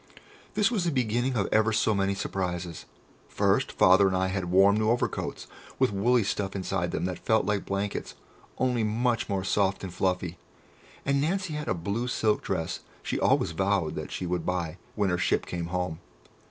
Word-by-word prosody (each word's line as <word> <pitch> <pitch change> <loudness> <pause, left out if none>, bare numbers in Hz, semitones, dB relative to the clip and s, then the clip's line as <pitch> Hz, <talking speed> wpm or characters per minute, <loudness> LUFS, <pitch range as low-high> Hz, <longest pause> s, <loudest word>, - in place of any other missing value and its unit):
This 210 +2 +3
was 210 -7 0
the 175 - +1
beginning 125 0 0
of 100 -4 +1
ever 110 +1 +3
so 110 0 +2
many 100 -1 +1
surprises. 90 -4 -3 0.4
First, - - +1
Father 95 +2 +5
and 95 -1 +1
I 95 0 +1
had 95 -1 -2
warm 95 +3 +5
new 110 0 +2
overcoats, 120 +1 -1 0.3
with 130 -5 +2
woolly 120 +4 +3
stuff 100 -1 -2
inside 95 -2 -1
them - - -2
that 90 -2 -3
felt 110 0 +2
like 105 -2 -1
blankets, 100 +1 -3 0.4
only 125 -3 +1
much 115 +2 0
more 95 -2 -1
soft 95 0 +1
and 95 -2 -5
fluffy, 90 -2 -1 0.7
and 140 0 +2
Nancy 180 +2 -1
had 150 0 -4
the - - +1
blue 100 +8 -2
silk 110 -3 +1
dress 80 -4 -2 0.2
she - - -2
always - - +2
vowed 95 -1 0
that - - -6
she 90 - -3
should 90 -1 -1
buy 90 -2 -2 0.2
when 100 -3 +1
her 90 - 0
ship - - +1
came 85 -1 -4
home. 90 -2 -2
100 Hz, 185 wpm, -28 LUFS, 90-115 Hz, 0.7 s, Father